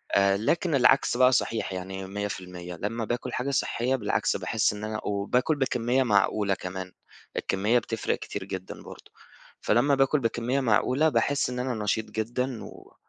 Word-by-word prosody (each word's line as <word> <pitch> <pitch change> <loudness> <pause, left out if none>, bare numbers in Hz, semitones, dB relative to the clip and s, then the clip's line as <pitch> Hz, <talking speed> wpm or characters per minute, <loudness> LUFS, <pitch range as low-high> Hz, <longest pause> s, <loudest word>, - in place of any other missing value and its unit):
آآ، 100 0 +4
لكن 165 - +1
العكس 125 -2 +4
بقى 130 0 +6
صحيح 115 -5 0
يعني 95 +1 -5
100%، 90 -3 -5
لمّا 110 +6 -3
باكُل 120 +3 -3
حاجة 130 +3 -1
صحِّية 130 -1 0
بالعكس، 105 -5 0
باحِس 110 -1 +1
إن 105 0 -7
أنا 110 0 -3
وباكُل 105 +9 0
بكمِّية 130 -2 +1
معقولة 105 -2 +2
كمان، 95 0 -6 0.5
الكمِّية 105 +5 +2
بتفرِّق 115 -1 -2
كتير - - -5
جدًا 95 0 -7
برضه. - - -12 0.5
فلمّا 140 +6 +3
باكُل 135 +2 +3
بكمِّية 120 +2 0
معقولة، 130 +5 +3
باحِس 140 +1 +1
إن 125 - -4
أنا 125 0 -1
نشيط 110 +2 0
جدًا، 120 +2 -2
و - - -13
115 Hz, 155 wpm, -27 LUFS, 100-130 Hz, 0.5 s, بقى